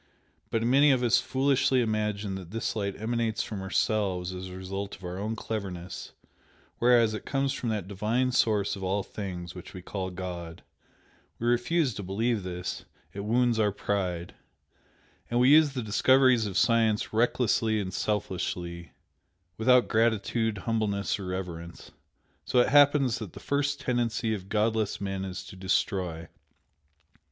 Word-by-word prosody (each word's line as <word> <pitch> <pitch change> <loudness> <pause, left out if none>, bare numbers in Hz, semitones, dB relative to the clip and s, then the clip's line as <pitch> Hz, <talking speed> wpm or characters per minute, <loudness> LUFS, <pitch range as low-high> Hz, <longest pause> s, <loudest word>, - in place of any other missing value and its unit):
But 115 0 0
many 135 +5 +5
of 130 -3 +3
us 120 0 +4
foolishly 135 +1 +2
imagine 105 -3 -1
that 95 -3 -7
this 115 +3 -3
light 100 -2 -3
emanates 115 0 -1
from 105 -3 -6
ourselves 95 -2 0
as 90 0 -6
a 90 0 -8
result 95 +2 -5
of 95 - -18
our 90 +1 -5
own 110 +3 -2
cleverness, 95 -6 -5 0.7
whereas 120 -2 +4
it 110 - -5
comes 135 -1 0
from 120 - -3
that 105 -4 -2
Divine 110 +6 0
Source 105 -5 +2
of 95 - -9
all 95 +2 0
things, 90 -5 -6
which 90 0 -10
we 90 - -8
call 95 -1 -4
God. 90 -2 -7 0.7
We 115 - -4
refuse 125 +4 +2
to 100 - -6
believe 105 +4 -1
this, 90 -1 -5 0.3
it 100 - -7
wounds 120 +1 +2
our 105 -2 +3
pride. 90 -4 -2 1.0
And 120 - +1
we 125 +1 +5
use 150 -1 +6
the 125 -3 -3
discoveries 125 +1 +4
of 95 - -3
science 115 -3 +2
recklessly 115 -1 +2
and 95 -3 -4
selfishly 90 -4 -3 0.6
without 125 +4 +4
gratitude, 110 0 +1
humbleness 105 -1 -1
or 95 - -6
reverence. 85 -2 -6 0.5
So - - -1
it 125 - +5
happens 145 -3 +5
that 105 -6 -7
the - - -9
first 145 0 -1
tendency 120 -4 0
of 95 -2 -6
godless 110 -1 0
men 95 -1 -3
is 95 -1 -5
to - - -11
destroy. 95 -3 -1
110 Hz, 155 wpm, -28 LUFS, 95-120 Hz, 1.0 s, use